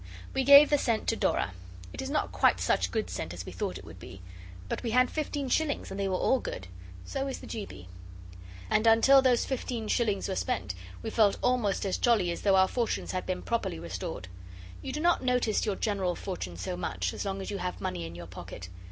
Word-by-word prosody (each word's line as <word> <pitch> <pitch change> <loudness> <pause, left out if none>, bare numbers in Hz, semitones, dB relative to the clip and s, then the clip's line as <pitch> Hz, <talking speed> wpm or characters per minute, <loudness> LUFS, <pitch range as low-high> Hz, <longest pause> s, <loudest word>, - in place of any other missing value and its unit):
We 265 - +1
gave 280 +2 +9
the 290 - +4
scent 230 -4 0
to 225 - +2
Dora. 100 - 0 0.4
It - - -5
is - - -4
not - - 0
quite - - +3
such - - +1
good - - -1
scent - - -5
as - - -7
we - - -7
thought - - -3
it - - -11
would - - -11
be, 95 - -10 0.5
but - - -3
we 235 - -2
had 250 +2 +3
fifteen 290 -2 -2
shillings 285 -2 0
and 195 - -5
they 195 - 0
were 190 - 0
all 260 +7 +2
good, 95 - -6 0.4
so 270 - -3
is 270 - -3
the - - -11
G. 215 -3 -5
B. 90 -1 -11 0.8
And 215 +2 +2
until 245 +5 +7
those 250 -3 +3
fifteen 245 -4 -3
shillings 210 -4 +1
were 190 - -2
spent 95 - -2 0.3
we 225 - -3
felt 215 -3 +4
almost 240 -6 +1
as 190 - -1
jolly 215 -8 +3
as 170 - -5
though 195 -2 +4
our 190 0 +5
fortunes 235 +1 -1
had 185 - -3
been 185 -1 -2
properly 235 - -1
restored. 90 +2 -5 0.5
You - - -5
do 300 - -3
not 345 -3 +3
notice 250 -4 +1
your 205 - +1
general 195 -5 -1
fortune 95 - -5
so 90 0 -3
much, 90 0 -2
as - - -4
long 195 -1 -3
as 195 - -5
you 200 - -3
have 180 0 -3
money 90 -2 -3
in 85 - -10
your 85 0 -8
pocket. 90 +1 -9
205 Hz, 230 wpm, -29 LUFS, 175-250 Hz, 0.8 s, gave